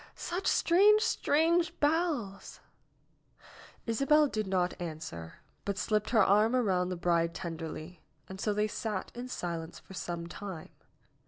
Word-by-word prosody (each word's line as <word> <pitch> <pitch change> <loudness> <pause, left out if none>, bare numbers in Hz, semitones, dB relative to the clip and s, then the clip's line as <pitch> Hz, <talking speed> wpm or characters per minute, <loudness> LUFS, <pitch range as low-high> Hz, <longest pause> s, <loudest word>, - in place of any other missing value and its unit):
Such 355 +3 -3
strange, 415 +5 +5
strange 335 +2 +2
bells 290 - -1 0.6
!" - - -22
Isabel 275 +6 +4
did 215 -7 -2
not 185 -1 +1
answer, 155 - -6 0.3
but 200 -1 -3
slipped 215 0 0
her 225 -4 +5
arm 210 +5 +4
around 185 -7 +1
the 185 - -2
bride 170 -1 +1
tenderly, 165 -1 -6 0.3
and 190 0 -8
so 210 - +1
they 210 +1 +1
sat 210 -2 -4
in 245 +1 -6
silence 170 -7 -5
for - - -14
some 175 -2 -4
time. 175 -1 -7
200 Hz, 140 wpm, -31 LUFS, 175-270 Hz, 0.6 s, strange